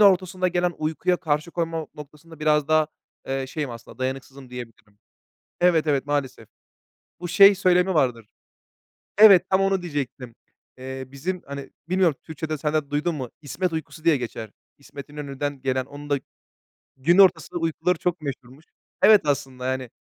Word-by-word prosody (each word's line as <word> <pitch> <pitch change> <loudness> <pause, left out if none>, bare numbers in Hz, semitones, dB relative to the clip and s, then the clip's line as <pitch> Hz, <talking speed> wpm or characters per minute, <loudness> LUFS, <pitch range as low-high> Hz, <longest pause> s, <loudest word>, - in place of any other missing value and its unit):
ortasında 185 -2 +4
gelen 175 0 0
uykuya 160 +3 0
karşı 155 -1 -1
koyma 165 -2 -3
noktasında 150 +2 -13
biraz 150 -1 +2
daha, 155 -1 +4 0.4
eee, 135 0 -2
şeyim. 145 -3 -4
Aslında 115 +2 -11
dayanıksızım 130 0 -5
diyebilirim. 115 -4 -10 0.6
Evet, 165 -3 +4
evet, 140 -2 +1
maalesef. 145 -3 -3 0.7
Bu 175 - -5
şey 200 +3 +7
söylemi 185 0 +3
vardır. 125 -7 +1 0.9
Evet, 195 -4 +8
tam 190 0 +3
onu 195 -1 +1
diyecektim. 135 -7 -5 0.4
Eee, 130 +1 -6
bizim, 170 +7 -4
hani, 140 0 -7 0.2
bilmiyorum 180 -5 +3
Türkçede 155 -1 -5
sen 150 +1 -2
de 150 -2 0
duydun 150 +3 -1
mu, 130 -4 -5
İsmet 165 +4 -3
uykusu 160 0 -6
diye 165 -4 +4
geçer. 115 -3 -6 0.3
İsmet 140 0 -11
İnönü'den 145 -1 -5
gelen... 130 -1 -1
Onun 145 +1 -11
da 145 - +1 0.8
gün 165 +7 +3
ortasında 190 -2 +4
uykuları 165 +2 0
çok 175 -3 -1
meşhurmuş. 135 +1 -8 0.4
Evet, 210 0 +7
aslında 135 -3 -2
yani, 130 -1 -2
150 Hz, 150 wpm, -24 LUFS, 135-175 Hz, 0.9 s, Evet